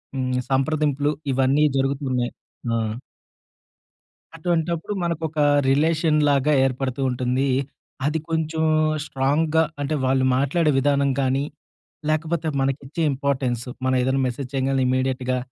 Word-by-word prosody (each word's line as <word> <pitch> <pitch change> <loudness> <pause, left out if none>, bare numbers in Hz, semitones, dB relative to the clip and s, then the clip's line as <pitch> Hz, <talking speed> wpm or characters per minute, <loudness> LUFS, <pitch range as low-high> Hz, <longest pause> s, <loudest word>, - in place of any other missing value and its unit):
హ్మ్. 130 -1 -1 0.2
సంప్రదింపులు 145 +1 +1 0.2
ఇవన్నీ 135 +3 +3
జరుగుతున్నాయి. 135 -2 -1 0.4
ఆ! - - +2 1.6
అటువంటప్పుడు 170 +2 -1
మన‌కోక 160 -2 -2 0.3
రిలేషన్ 155 +2 +2
లాగా 140 +1 +2
ఏర్పడుతూ 130 0 -2
ఉంటుంది. 125 +2 0 0.6
అది 155 +2 +1
కొంచెం 160 0 -1 0.4
స్ట్రాంగ్‌గా 150 +4 +1 0.2
అంటే 150 +2 -1
వాళ్ళు 130 0 +2
మాట్లాడే 150 +4 +2
విధానం 140 0 +2
కానీ 135 +1 +1 0.7
లేకపోతే 160 +1 -1
మనకి 135 +1 0
ఇచ్చే 160 +4 -4
ఇంపార్టెన్సు 130 -3 -1 0.2
మనం 130 0 +2
ఏదైనా 130 +1 +1
మెసేజ్ 125 +1 -5
చేయంగాలనే 135 0 +1
ఇమ్మీడియేట్‌గా 130 0 0
140 Hz, 110 wpm, -23 LUFS, 130-155 Hz, 1.6 s, ఇవన్నీ